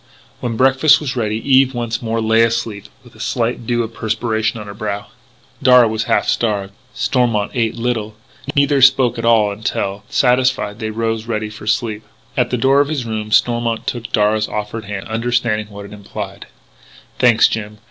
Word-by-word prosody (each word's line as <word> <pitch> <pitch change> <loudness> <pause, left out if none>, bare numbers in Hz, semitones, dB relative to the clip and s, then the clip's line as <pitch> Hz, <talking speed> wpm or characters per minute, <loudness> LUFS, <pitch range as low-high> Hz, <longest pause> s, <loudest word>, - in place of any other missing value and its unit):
When 115 -2 -3
breakfast 135 +4 +5
was 135 -5 -4
ready 110 -3 -1
Eve 135 -1 +4
once 120 -1 -3
more 115 -1 -2
lay 110 +1 +3
asleep 115 -3 -1 0.2
with 120 -2 -18
a - - -18
slight 120 -2 -2
dew 120 -1 +1
of 115 0 -7
perspiration 110 0 -1
on 105 - -8
her 100 - -8
brow. 100 0 -4 0.6
Darragh 125 -3 +6
was 110 0 -2
half - - +1
starved: 100 -4 -1 0.2
Stormont 115 -6 0
ate 115 -3 0
little. 115 -3 -2 0.4
Neither 140 -1 +3
spoke 130 -2 +4
at 115 - -3
all 110 -3 +4
until, 100 -1 -3
satisfied, 125 -4 +1
they 110 -2 -3
rose, 115 0 -2
ready 110 -2 -3
for 105 0 -11
sleep. 110 -3 0 0.3
At 125 -2 +1
the 125 - -1
door 135 +4 +4
of 145 - 0
his 145 -6 -2
room 110 -1 -4
Stormont 120 0 +1
took 120 -2 -4
Darragh's 105 0 +2
offered 105 +1 -5
hand, 100 -1 -6
understanding 115 -2 -1
what 100 -1 -9
it 100 - -11
implied: 100 -1 -8 0.7
"Thanks, 120 -2 +5
Jim.... 105 -1 -5
115 Hz, 180 wpm, -18 LUFS, 105-120 Hz, 0.7 s, Darragh